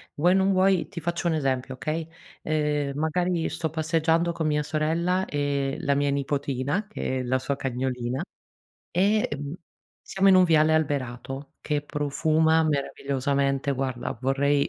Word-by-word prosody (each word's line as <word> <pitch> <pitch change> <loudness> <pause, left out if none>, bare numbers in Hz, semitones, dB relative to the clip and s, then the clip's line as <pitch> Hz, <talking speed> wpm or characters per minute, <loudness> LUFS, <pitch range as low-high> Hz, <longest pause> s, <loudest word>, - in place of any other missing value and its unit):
vuoi 175 +5 +3
o - - +3
non 195 +1 +3
vuoi 190 -1 +3
ti - - -7
faccio 170 +2 -2
un 170 - +2
esempio, 130 -3 -1
okay? 155 +4 -3 0.3
Eh 150 -2 0
magari 165 +3 0
sto 160 - -3
passeggiando 160 +2 +1
con 160 -2 -2
mia 150 0 +1
sorella 165 +5 0
e 140 -3 -1
la 140 - +1
mia 140 0 +1
nipotina 140 +5 -1
che 130 -10 -3
è - - -2
la 130 +1 +1
sua 140 +2 -2
cagnolina 130 0 -2 0.7
e 205 +4 +2
mh 145 0 -6 0.5
siamo 195 0 +2
in 190 - +7
un 185 - +7
viale 160 -2 +4
alberato 135 -2 -2
che 150 -1 -1
profuma 160 +2 +2
meravigliosamente. 140 -1 0
Guarda 130 -3 -3
vorrei 140 +2 +2
150 Hz, 150 wpm, -26 LUFS, 140-165 Hz, 0.7 s, in